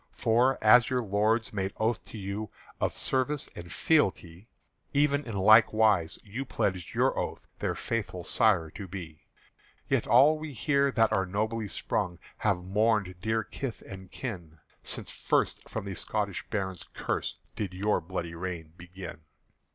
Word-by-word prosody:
"For, 120 +4 +3
as 115 +2 +7
your 125 -2 0
lords 110 +3 +1
made 95 -1 -2
oath 115 +1 0
to - - -9
you 100 +2 -4 0.3
Of - - -1
service 135 +2 0
and 85 0 -9
fealty, 95 - +1 0.5
Even 145 0 +3
in 110 -3 -4
like 110 +4 +7
wise 105 -7 +3
you 110 +6 -5
pledged 95 - -2
your - - +3
oath - - -4
Their - - -1
faithful 100 -6 -3
sire 85 -8 +2
to 100 - -7
be: 85 -4 -9 0.6
"Yet - - +1
all 140 +7 +6
we 155 -2 -6
here 140 +2 +2
that 115 -4 +3
are 95 -3 +1
nobly 110 +3 -1
sprung 95 -2 -2 0.2
Have 90 - 0
mourned 105 0 +1
dear 110 +1 0
kith 125 +2 -6
and 95 -1 -10
kin 85 -11 -6 0.2
Since - - -4
first - - 0
for - - -4
the 100 -1 -5
Scotish 100 +1 -2
Barons' 95 -4 -3
curse - - -2 0.2
Did 100 -5 -4
your 105 +3 +1
bloody 85 -1 -4
rule 90 -1 -4
begin." 90 -1 -9
105 Hz, 155 wpm, -29 LUFS, 95-115 Hz, 0.6 s, as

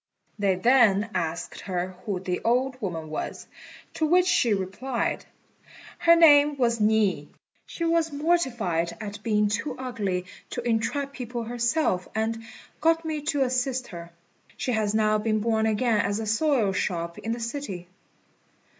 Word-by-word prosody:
They 195 -2 +2
then 220 -1 +4
asked 165 +1 -3
her 180 -1 -3 0.2
who 195 -3 -1
the 180 -1 -3
old 255 +2 +1
woman 165 -6 -4
was; 155 - -5 0.5
to 315 - 0
which 360 +3 +4
she 345 -10 +3
replied, 205 +6 -2 0.7
"Her 335 0 +6
name 295 -3 +6
was 235 -3 +1
Ni. 210 -8 +2 0.4
She 335 - -4
was 330 -1 +2
mortified 240 - 0
at 205 -1 -7
being 210 -1 +2
too 215 +8 -2
ugly 205 -8 -3 0.2
to 245 -1 -4
entrap 275 +5 -1
people 245 -2 -5
herself, 240 - 0
and 225 +1 -1 0.4
got 330 +1 +2
me 310 -2 -2
to 290 -3 +1
assist 255 0 -1
her. 170 -2 -8 0.5
She 255 - -2
has 215 -2 0
now 215 -1 +3
been 215 0 0
born 220 0 +1
again 220 +1 +2
at 200 0 0
a 220 - -3
soy 220 -1 +2
shop 170 -3 -2
in 225 - -4
the 240 - -5
city." 230 -7 -5
225 Hz, 150 wpm, -26 LUFS, 200-265 Hz, 0.7 s, Her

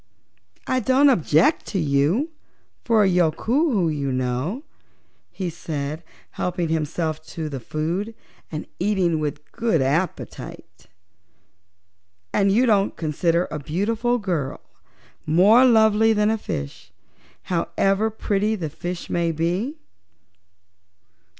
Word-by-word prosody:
"I 255 - +1
don't 265 +3 +4
object 170 - +2
to 195 - -2
you 155 - +1 0.5
for 225 -3 +3
a - - +4
Yookoohoo, 190 - +2
you 140 -2 -2
know," 130 - -2 0.7
he 185 -3 -4
said, 155 -1 -4 0.3
helping 175 -2 -2
himself 160 0 -2
to 160 -1 -5
the 135 -2 -5
food 170 - -3 0.4
and 155 -1 -5
eating 180 -4 +1
with 150 -1 -5
good 230 -8 +1
appetite. 150 +7 -3 1.5
"And 200 -1 +3
don't 215 -3 +4
you - - -6
consider 165 +2 0
a 150 - -3
beautiful 215 - 0
girl 175 - -3 0.7
more 200 +11 +6
lovely 220 -2 +5
than 210 0 +2
a 225 - 0
fish, 70 - -6 0.5
however 195 +4 0
pretty 210 0 0
the 165 -7 -4
fish 175 +3 -5
may 170 -1 0
be?" 180 - -1
180 Hz, 110 wpm, -23 LUFS, 155-220 Hz, 1.5 s, more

